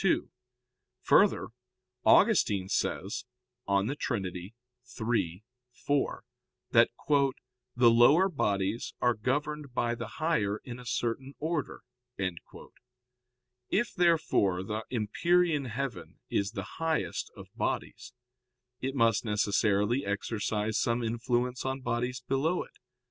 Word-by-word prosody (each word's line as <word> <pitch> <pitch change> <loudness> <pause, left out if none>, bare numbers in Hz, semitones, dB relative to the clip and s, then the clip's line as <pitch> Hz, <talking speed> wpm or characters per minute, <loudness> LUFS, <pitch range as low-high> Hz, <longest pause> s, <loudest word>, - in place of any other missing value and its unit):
2: - - +1 0.7
Further, - - +4 0.5
Augustine 95 -2 +4
says 100 +3 -2 0.4
(De 100 +7 +1
Trin. 120 -9 -2
iii, 90 +4 -7 1.1
4) 140 +3 -1 0.5
that - - +6 0.9
"the 120 -1 +6
lower 140 +11 +6
bodies 105 - -1
are 120 0 +3
governed 140 +4 -2
by 120 0 +1
the 115 -1 -5
higher 110 -11 +1
in 125 -1 -8
a 125 - -11
certain 120 +4 -2
order." 160 -2 -3 1.9
If, 215 +3 0
therefore, 155 - +2
the 105 +3 -4
empyrean 150 +7 +1
heaven 130 +2 -5
is 100 +1 0
the 100 +4 -7
highest 160 -1 -1
of - - -11
bodies, - - -3 0.6
it 135 +1 -3
must 115 -4 +3
necessarily 105 +2 +1
exercise 105 +1 -1
some 120 +1 0
influence 120 +2 -1
on 130 0 -3
bodies 125 +1 -2
below 155 +7 +1
it. - - -21
120 Hz, 105 wpm, -30 LUFS, 105-140 Hz, 1.9 s, that